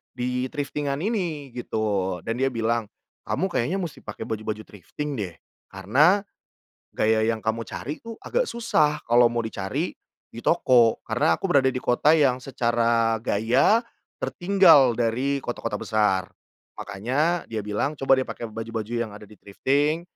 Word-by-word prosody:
di 125 +1 -1
thrifting-an 145 0 -3
ini 170 - -2
gitu, 100 -6 -2
dan 115 +1 -3
dia 135 - +2
bilang, 115 0 0 0.4
"Kamu 190 - 0
kayaknya 130 +8 0
musti 165 -6 -5
pakai - - -7
baju-baju 110 0 -4
thrifting 140 - -7
deh, 90 -5 -4 0.4
karena 140 - +3 0.7
gaya 110 0 +2
yang 110 -1 0
kamu 115 +1 -2
cari 150 +4 -6
tuh 230 0 -7
agak - - 0
susah 205 - +1
kalau 120 +1 +6
mau 120 - 0
dicari 100 -4 -3 0.3
di 115 - -10
toko." 125 -9 +4
Karena 115 +2 +2
aku - - -1
berada 135 -5 +4
di 130 - -2
kota 145 +5 +3
yang 130 -5 +3
secara 115 -3 +1
gaya 125 - +3 0.4
tertinggal 175 - +5
dari 125 +5 0
kota-kota 120 -1 -4
besar. 105 -4 +1 0.6
Makanya 140 - -1
dia 110 -2 -4
bilang, 105 +8 -2
"Coba 135 -2 +3
deh 130 - -1
pakai 115 -2 -6
baju-baju 115 0 -5
yang 120 -2 -2
ada 105 - -11
di 105 - -16
thrifting." 145 +10 0
120 Hz, 150 wpm, -24 LUFS, 110-150 Hz, 0.7 s, kalau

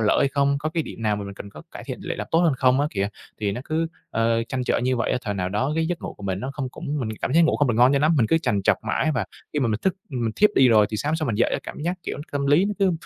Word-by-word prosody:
lỡ 105 - +3
hay 140 - +3
không, 140 0 +1
có 150 +2 -2
cái 165 0 -1
điểm 115 - -9
nào 105 -2 +1
mà 100 - -5
mình 100 0 -7
cần 100 - -9
có 75 -6 -11
cải - - -8
thiện - - -6
để - - -4
làm - - -4
tốt 165 - +3
hơn 170 -3 +4
không 130 +1 +3
á 145 - +2
kìa, 100 -1 -1 0.3
thì 100 -2 0
nó 120 - -4
cứ, 160 +1 0 0.2
ờ, 115 0 +1
trăn 130 -1 -2
trở - - +1
như 125 +1 0
vậy 120 - 0
á. - - +1
Thời 105 -3 -3
nào 90 -2 -1
đó, 125 +9 -1
cái 160 0 +1
giấc 175 0 -3
ngủ - - -5
của - - -15
mình 95 -1 -2
nó 130 - -4
không 135 -3 -3
cũng 145 +3 -4
mình 120 - -2
cảm 130 - -1
giác 165 - +5
ngủ 160 - +3
không 145 - +2
được 120 - +1
ngon 125 +4 +5
cho 140 - +3
lắm, 155 +3 +3
mình 115 -5 +3
cứ 165 - +3
trằn 105 -11 0
trọc - - +4
mãi 135 +8 +1
và 120 -5 0 0.3
khi 150 - -1
mà 125 - +2
mình 110 0 -1
thức 190 -1 +1
mình 120 -4 -2
thiếp 210 - +5
đi 130 -1 +6
rồi 110 -3 +5
thì 110 - -2
sáng 145 +8 -1
hôm 160 - +1
sau 155 -2 -2
mình 115 - 0
dậy - - +2
á - - +1
cảm - - -8
giác, 175 +2 0
kiểu, - - -4
nó 145 - -6
tâm 140 -1 -1
lý 145 +6 +5
nó 205 - -1
cứ, 195 -3 +3
130 Hz, 360 wpm, -24 LUFS, 110-155 Hz, 0.3 s, đi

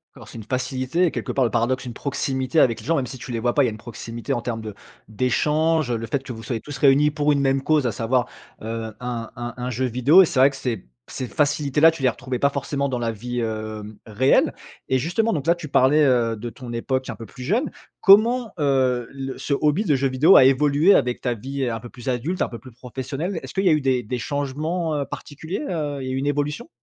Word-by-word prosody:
D'accord, - - -13
c'est - - -10
une 110 - -7
facilité 130 +7 0
quelque - - -4
part, 135 - +1
le 115 - -1
paradoxe, 120 +3 0
une 120 - -6
proximité 135 +2 -1
avec 115 -5 +3
les - - -12
gens, 165 - +2
même 135 - 0
si 125 +2 -8
tu 125 - -8
les 115 - -2
vois 120 +1 0
pas, 145 - +4
il - - +3
y - - +1
a - - -6
une 110 - -8
proximité 115 0 -6
en 120 - -2
termes 115 -1 -4
de 110 -1 -7 0.4
d'échanges, 150 +6 +1
heu, 120 - 0
le 115 0 -6
fait 135 +4 -2
que 130 - -7
vous 115 -1 -9
soyez 115 -3 -3
tous 145 +1 -8
réunis 140 +2 +4
pour 150 0 +1
une 145 - +2
même 135 0 +2
cause, 150 -1 +2
à - - 0
savoir, 120 +3 0 0.4
heu, 110 0 -5
un 120 -2 -4
un 120 0 -5
un 125 0 -3
jeu 130 +1 -1
vidéo. 130 +9 +5
Et - - +3
c'est 140 - -1
vrai 135 +2 +7
que 140 - -10
ces 120 -7 -4 0.2
ces 130 - -5
facilités 145 +1 0
là, 160 +2 +8
tu 160 -4 -8
les 130 - +5
retrouvais 130 0 -4
pas 140 - +3
forcément 140 0 -2
dans 125 -2 -2
la 115 -1 -1
vie, 120 +3 -5
hem, 110 -2 -5
réelle. 115 +4 +2 0.4
Et 130 - +3
justement, 180 - 0
donc 145 -1 -3
là, 170 - +5
tu 170 -3 -8
parlais, 140 +4 +4
heu, 120 -4 +2
de 115 +3 -6
ton 120 0 -9
époque 130 +2 -2
un - - -4
peu 115 - -9
plus 125 +4 -11
jeune. 225 - 0 0.3
Comment, 225 +4 +5
heu, 130 -4 +1
le 135 -1 -6
ce 145 - -2
hobby 150 +7 +2
de 150 - +3
jeux 135 0 +1
vidéo 140 +8 +5
a - - +9
évolué 145 +7 +4
avec 125 -1 +1
ta 125 - 0
vie 130 +3 -3
un 115 -1 -3
peu 120 +2 -10
plus 125 +1 -7
adulte, 135 +9 -2
un - - +1
peu 115 - -8
plus 130 +4 -13
professionnelle? 135 - -5
Est-ce - - -9
qu'il 195 0 0
y - - +6
a - - +5
eu 150 - +1
des 130 -2 +1
des 125 +4 -3
changements, 150 +5 -2
heu, 145 -1 -1
particuliers, 160 - -6
heu, 150 -4 -3
il 130 - -5
y - - -3
a - - -2
eu - - -1
une 135 +2 -2
évolution? 145 +1 -2
130 Hz, 265 wpm, -23 LUFS, 120-150 Hz, 0.4 s, a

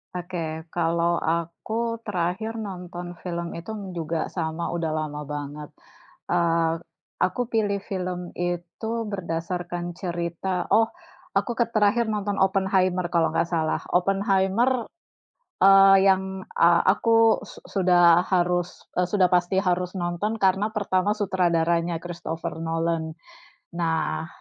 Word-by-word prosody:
Oke. 165 -3 -5
Kalau 170 0 +1
aku, 170 +8 -2
terakhir 210 +4 -2
nonton 180 -3 -6
film 170 -1 -4
itu 170 +6 -7 0.2
juga 165 -1 -2
sama, 165 -1 -3
udah 165 -2 -1
lama 150 -1 -3
banget. 145 +1 -6 0.6
Eee, 165 -1 +2 0.4
aku 185 +7 0
pilih 205 -3 0
film 180 -2 -3
itu 175 +4 -3 0.2
berdasarkan 175 -1 -4
cerita 175 0 -3
oh, 225 0 +5 0.5
aku 240 -2 0
ke 235 - +3
terakhir 215 +2 +3
nonton 205 -2 -2
Oppenheimer 190 -2 +2
kalau 165 -2 +1
enggak 165 - +1
salah. 160 -2 0
Oppenheimer 195 +6 +2 0.7
eee, 195 0 +8
yang, 190 0 +1 0.2
eee, 170 0 +5
aku 225 +2 +4
su - - -12
sudah 175 -2 +5
harus, 175 -1 0 0.2
e 180 - +3
sudah 185 0 +2
pasti 180 +1 +2
harus 180 -1 0
nonton, 190 +4 -2
karena 195 +3 +2
pertama 200 -2 +1
sutradaranya 170 -4 +1
Christopher 165 -2 -5
Nolan. 165 -1 -1 0.7
Nah, 160 -1 -1
180 Hz, 115 wpm, -25 LUFS, 170-195 Hz, 0.7 s, eee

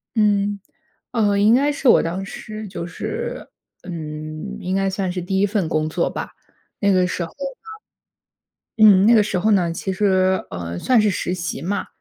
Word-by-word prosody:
嗯， 205 -1 +2 0.5
呃， 205 -4 +2
应 210 +3 +5
该 280 +4 +3
是 285 -2 -2
我 - - +6
当 175 +4 -3
时 215 +2 -8
就 185 -2 -6
是 440 - -5 0.4
嗯， 155 -3 -6
应 185 +1 -2
该 195 0 +1
算 190 -1 -2
是 180 0 -4
第 190 +2 -1
1 200 - +4
份 200 -5 -1
工 155 -1 0
作 - - 0
吧， - - -6 0.5
那 200 -1 +3
个 185 -1 +3
时 180 -1 -3
候 165 - -7
呢 275 - -8 1.1
嗯， 195 -2 +7
那 235 - +6
个 215 - +6
时 200 -2 -1
候 210 +5 +2
呢， 180 -5 +3
其 190 +3 -3
实， 190 -1 +2
呃， 85 -1 -5
算 250 -3 +3
是 210 -1 +3
实 180 -1 -2
习 175 -1 -4
嘛， 200 +4 -2
195 Hz, 195 characters per minute, -21 LUFS, 180-210 Hz, 1.1 s, 嗯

